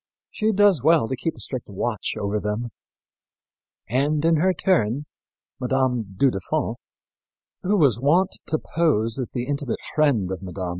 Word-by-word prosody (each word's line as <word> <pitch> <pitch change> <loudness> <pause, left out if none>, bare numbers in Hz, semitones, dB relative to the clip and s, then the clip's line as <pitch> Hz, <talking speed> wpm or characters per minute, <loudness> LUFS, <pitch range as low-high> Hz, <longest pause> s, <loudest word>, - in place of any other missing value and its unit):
She 220 -1 0
does 205 - +4
well 155 -3 +4
to 130 - -2
keep 160 +6 -3
a - - -12
strict 130 -5 -5
watch 110 +3 -3
over 100 +1 -1
them." 105 +3 -3 1.2
And, 145 +6 +1
in 165 -1 +4
her 185 +5 +3
turn, 145 - +1 0.5
Mme. 125 -5 0
du 135 +3 +4
Deffand, 95 -4 -2 0.8
who 205 +3 +1
was 135 - +4
wont 170 +7 +3 0.2
to 155 - +1
pose 135 -10 0
as 125 - -2
the 120 -1 -3
intimate 140 -2 -2 0.2
friend 130 -12 +2
of 95 - -4
Mme. 90 -3 -8
130 Hz, 155 wpm, -23 LUFS, 110-160 Hz, 1.2 s, does